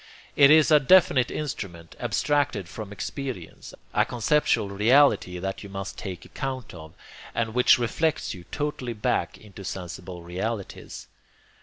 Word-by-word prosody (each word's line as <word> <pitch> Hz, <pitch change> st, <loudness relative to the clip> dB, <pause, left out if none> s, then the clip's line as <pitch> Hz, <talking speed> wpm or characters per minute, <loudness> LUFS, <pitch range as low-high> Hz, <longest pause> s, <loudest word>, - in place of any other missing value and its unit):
It 140 Hz, -1 st, +7 dB
is 155 Hz, 0 st, +6 dB
a 150 Hz, -, +8 dB
definite 135 Hz, -4 st, +5 dB
instrument 90 Hz, -, -6 dB
abstracted 145 Hz, -10 st, 0 dB
from 105 Hz, +2 st, -8 dB
experience, 120 Hz, -, -6 dB, 0.2 s
a -, -, +4 dB
conceptual 120 Hz, -3 st, +1 dB
reality 105 Hz, -2 st, +3 dB
that 95 Hz, +2 st, -4 dB
you 100 Hz, -, -9 dB
must 95 Hz, 0 st, -6 dB
take 95 Hz, -4 st, -7 dB
account 130 Hz, -3 st, -5 dB
of, 80 Hz, -2 st, -11 dB, 0.4 s
and 115 Hz, -1 st, -1 dB
which 125 Hz, +1 st, +5 dB
reflects 145 Hz, +6 st, -1 dB
you 90 Hz, -3 st, -11 dB
totally 145 Hz, -5 st, -3 dB
back 105 Hz, -, -1 dB
into 100 Hz, -2 st, -12 dB
sensible 90 Hz, -1 st, -7 dB
realities. 95 Hz, +4 st, -5 dB
110 Hz, 135 wpm, -26 LUFS, 95-135 Hz, 0.4 s, a